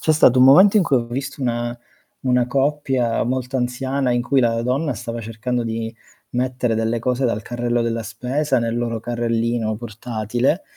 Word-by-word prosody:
C'è 155 - +2
stato 130 -5 +5
un 130 - +7
momento 195 +10 +7
in - - +4
cui 140 - +2
ho 120 - 0
visto 135 +4 -5
una 120 -1 -2 0.4
una 125 -1 +2
coppia, 135 -3 0
molto 130 +2 -2
anziana, 130 +1 -1
in 120 - +2
cui 135 +2 +2
la 115 -1 +1
donna 135 +5 0
stava 115 +1 -5
cercando 115 +3 -3
di 115 0 -4 0.4
mettere 125 -1 0
delle 115 +1 0
cose 125 +3 0
dal 115 -3 0
carrello 120 0 -1
della 115 0 -1
spesa 130 +5 -1
nel 115 0 -1
loro 115 -1 -2
carrellino 115 -1 -1
portatile, 120 - -2
120 Hz, 175 wpm, -21 LUFS, 115-130 Hz, 0.4 s, un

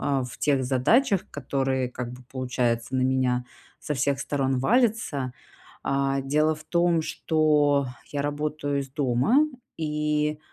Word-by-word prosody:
э, 135 -2 0
в 125 - -9
тех 140 -3 +2
задачах, 190 - +2
которые, 135 -2 -1
как 125 -1 -5
бы, 125 0 -11
получается, 125 -2 -1
на 130 - +2
меня 130 -1 +1 0.3
со 150 - -3
всех 140 +1 0
сторон 135 -2 0
валятся. 215 - +1 0.5
А, 135 0 0
дело 150 +3 +2
в 155 - -12
том, 170 0 +2
что 150 -3 +2 0.3
я 145 -1 -1
работаю 145 -1 -2
из 135 -1 -7
дома, 135 - +2 0.4
и, 150 -1 -1
140 Hz, 135 wpm, -26 LUFS, 130-150 Hz, 0.5 s, тех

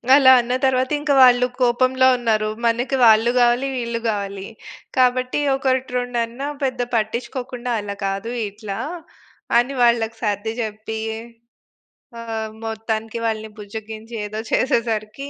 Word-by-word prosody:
అలా 270 -2 +7
అన్న 240 +1 -3
తరువాత 260 0 +1
ఇంక 295 0 -1
వాళ్ళు 250 0 +6
కోపంలో 255 +1 +3
ఉన్నారు. 220 -3 0 0.2
మనకు 240 +4 +1
వాళ్ళు 225 +1 +6
కావాలి, 245 +2 +3
వీళ్ళు 235 -2 -2
కావాలి. 200 -2 -3 0.5
కాబట్టి 255 +1 +2 0.2
ఒకటి 260 -1 -1
రెండన్నా 245 +2 -2 0.2
పెద్ద 255 -2 -1
పట్టించుకోకుండా 245 +2 -3
"అలా 200 0 -5
కాదు 195 +4 -3 0.2
ఇట్లా" 200 -1 -7 0.8
అని 245 +3 +1
వాళ్ళకి 230 -1 +2
సర్ది 210 +1 -1
చెప్పి 220 +1 -5 1.2
ఆహ్, 220 -1 -4
మొత్తానికి 225 0 -3
వాళ్ళని 220 -1 -3
బుజ్జగించి, 220 +2 -8
ఏదో 215 +1 -5
చేసేసరికి 230 +1 0
230 Hz, 120 wpm, -21 LUFS, 220-250 Hz, 1.2 s, అలా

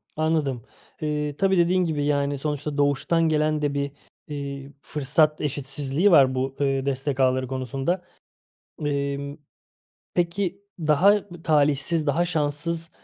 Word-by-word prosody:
Anladım. 155 -6 0 0.4
Eee, 150 -1 -2
tabii, 195 -1 +2
dediğin 180 +2 +3
gibi, 150 -4 -1
yani, 140 -1 +1
sonuçta 150 0 -3
doğuştan 150 +4 +2
gelen 155 0 +1
de 145 -1 0
bir, 140 0 -2 0.4
eee, 140 -1 -6
fırsat 150 +2 +1
eşitsizliği 145 +5 0
var 135 -5 +6
bu, 130 +1 -2
ııı, 135 -1 +1
destek 135 0 -2
ağları 130 0 +2
konusunda. 135 +7 -2 0.8
Emm, 140 0 -2 0.8
peki, 180 +2 -1 0.2
daha 160 +6 +4 0.2
b 175 -1 -11
talihsiz, 150 +1 +2
daha 165 +5 +2
şanssız, 160 +1 -2
145 Hz, 125 wpm, -24 LUFS, 140-160 Hz, 0.8 s, var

